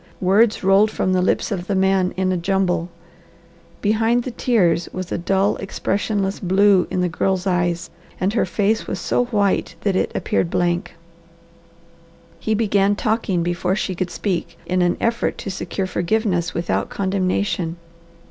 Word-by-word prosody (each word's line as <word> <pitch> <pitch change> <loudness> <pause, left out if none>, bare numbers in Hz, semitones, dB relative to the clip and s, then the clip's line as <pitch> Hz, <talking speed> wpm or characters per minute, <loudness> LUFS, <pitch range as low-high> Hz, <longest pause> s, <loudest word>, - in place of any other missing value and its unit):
Words 205 +4 +3
rolled 195 +3 +5
from 185 -3 -1
the 185 - +2
lips 185 - 0
of 180 -2 -3
the 200 - 0
man 190 -1 +2
in 185 0 +1
a - - +1
jumble. 180 -1 0 0.9
Behind 225 +3 +2
the 255 - -4
tears 195 -9 +2
there - - -11
was 185 -1 -5
a - - 0
dull, 195 +3 +1
expressionless 195 0 -2
blue 190 0 +3
in 180 - -1
the 180 - +2
girl's 185 +2 -1
eyes 175 -2 0 0.3
and 195 +2 0
her 230 - +2
face 210 +4 0
was - - -3
so 245 - +1
white 205 -7 0
that 200 -2 0
it - - 0
appeared 170 - 0
blank. 175 0 -1 1.4
He 220 +5 0
began 205 -2 +2
talking 215 -5 0
before 175 +2 0
she 195 -2 -2
could 180 0 -3
speak, 170 -4 -3
in 185 0 0
an 175 0 +2
effort 230 0 0
to 195 - -5
secure 190 +1 -3
forgiveness 180 -1 -1
without 170 - -1
condemnation. 185 -3 -1
190 Hz, 160 wpm, -21 LUFS, 180-205 Hz, 1.4 s, rolled